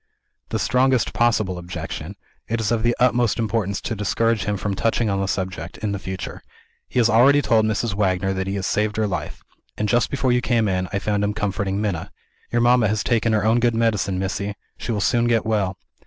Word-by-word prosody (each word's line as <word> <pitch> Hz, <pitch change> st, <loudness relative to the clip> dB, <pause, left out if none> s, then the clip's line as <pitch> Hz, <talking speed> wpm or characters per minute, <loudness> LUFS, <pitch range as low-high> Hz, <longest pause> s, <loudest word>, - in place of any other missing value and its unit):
"The -, -, -1 dB
strongest 130 Hz, -1 st, +2 dB
possible 110 Hz, -6 st, +1 dB
objection. 90 Hz, 0 st, -6 dB, 0.3 s
It 115 Hz, +1 st, -1 dB
is 110 Hz, -1 st, -1 dB
of 115 Hz, -2 st, +1 dB
the 120 Hz, +1 st, +2 dB
utmost 120 Hz, -3 st, +2 dB
importance 110 Hz, -3 st, -1 dB
to -, -, -3 dB
discourage 110 Hz, +2 st, 0 dB
him 105 Hz, -1 st, -1 dB
from 100 Hz, +2 st, -2 dB
touching 115 Hz, +2 st, 0 dB
on 100 Hz, 0 st, 0 dB
the 95 Hz, -, -1 dB
subject, 95 Hz, -3 st, -4 dB
in 105 Hz, -1 st, -3 dB
the 100 Hz, -, -3 dB
future. 95 Hz, -1 st, -6 dB, 0.5 s
He -, -, -5 dB
has 120 Hz, -2 st, +5 dB
already 125 Hz, +5 st, +5 dB
told 115 Hz, -5 st, +3 dB
Mrs. 110 Hz, 0 st, -1 dB
Wagner 95 Hz, -1 st, 0 dB
that 95 Hz, 0 st, -3 dB
he 95 Hz, -, -2 dB
has 95 Hz, -1 st, -2 dB
saved 105 Hz, 0 st, 0 dB
her 110 Hz, -, +2 dB
life; 100 Hz, -, -4 dB, 0.3 s
and, 105 Hz, -, 0 dB
just 120 Hz, +2 st, +2 dB
before 130 Hz, -2 st, 0 dB
you 125 Hz, 0 st, +2 dB
came 115 Hz, -3 st, +1 dB
in, 95 Hz, -1 st, -1 dB
I -, -, -1 dB
found 105 Hz, 0 st, -1 dB
him 105 Hz, 0 st, -1 dB
comforting 100 Hz, -1 st, -1 dB
Minna. 100 Hz, -6 st, -2 dB, 0.4 s
'Your 120 Hz, -, +2 dB
mamma 120 Hz, -2 st, +4 dB
has 105 Hz, +1 st, 0 dB
taken 115 Hz, -1 st, +1 dB
her 105 Hz, -1 st, +1 dB
own 115 Hz, +2 st, +4 dB
good 120 Hz, -1 st, +2 dB
medicine, 105 Hz, -4 st, +1 dB
Missy; 100 Hz, +2 st, -3 dB, 0.2 s
she -, -, -5 dB
will 105 Hz, -2 st, -1 dB
soon 120 Hz, +4 st, +2 dB
get 115 Hz, -2 st, +2 dB
well.' 100 Hz, -4 st, 0 dB
105 Hz, 215 wpm, -22 LUFS, 100-115 Hz, 0.5 s, has